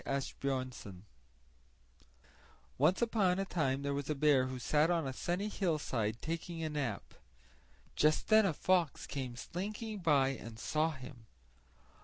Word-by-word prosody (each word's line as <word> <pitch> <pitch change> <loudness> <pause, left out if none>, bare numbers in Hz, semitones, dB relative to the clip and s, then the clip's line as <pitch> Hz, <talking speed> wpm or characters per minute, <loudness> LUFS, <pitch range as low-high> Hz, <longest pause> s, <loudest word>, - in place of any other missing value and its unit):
Asbjörnsen 130 -8 -3 1.8
Once 175 - +4
upon 205 -6 +2
a 195 - 0
time 140 -7 0
there 140 0 -1
was 140 +1 -3
a 150 - +1
bear, 140 -3 +4
who 130 0 -5
sat 150 +6 +2
on 170 -3 +1
a 130 - -3
sunny 180 +9 -2
hillside 140 - -1
taking 165 +1 -4
a 160 - -1
nap. 135 -9 -3 0.8
Just 150 +1 +2
then 215 -2 +6
a - - +2
fox 175 -1 +1
came 130 -4 -4
slinking 210 - -5
by 145 -6 +3
and 115 -4 -7
saw 155 +7 +1
him. 130 -4 -11
150 Hz, 140 wpm, -34 LUFS, 130-175 Hz, 1.8 s, then